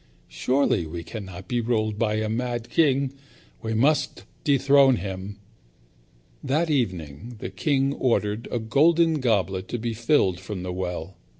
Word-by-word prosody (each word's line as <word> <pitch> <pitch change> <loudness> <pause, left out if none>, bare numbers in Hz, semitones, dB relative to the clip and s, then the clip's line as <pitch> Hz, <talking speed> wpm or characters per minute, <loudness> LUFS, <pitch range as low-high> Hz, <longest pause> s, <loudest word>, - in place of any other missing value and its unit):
Surely 90 - +1
we 85 +1 -6
cannot 95 -2 -8
be 120 -2 0
ruled 110 -2 -1
by 110 -2 +1
a 110 0 -1
mad 120 +1 -3
king. 140 -4 +2 0.5
We 110 0 -2
must 145 +7 +1 0.2
dethrone 140 -1 +5
him." 95 0 -6 1.1
That 155 +4 +1
evening 95 - -2
the 115 - -6
king 140 -3 +1
ordered 110 -4 0
a - - -1
golden 160 +7 +3
goblet 100 -6 0
to 120 - -3
be 115 0 -3
filled 110 - +2
from 95 -1 -6
the 90 -1 -4
well. 90 -1 -5
115 Hz, 140 wpm, -25 LUFS, 95-135 Hz, 1.1 s, dethrone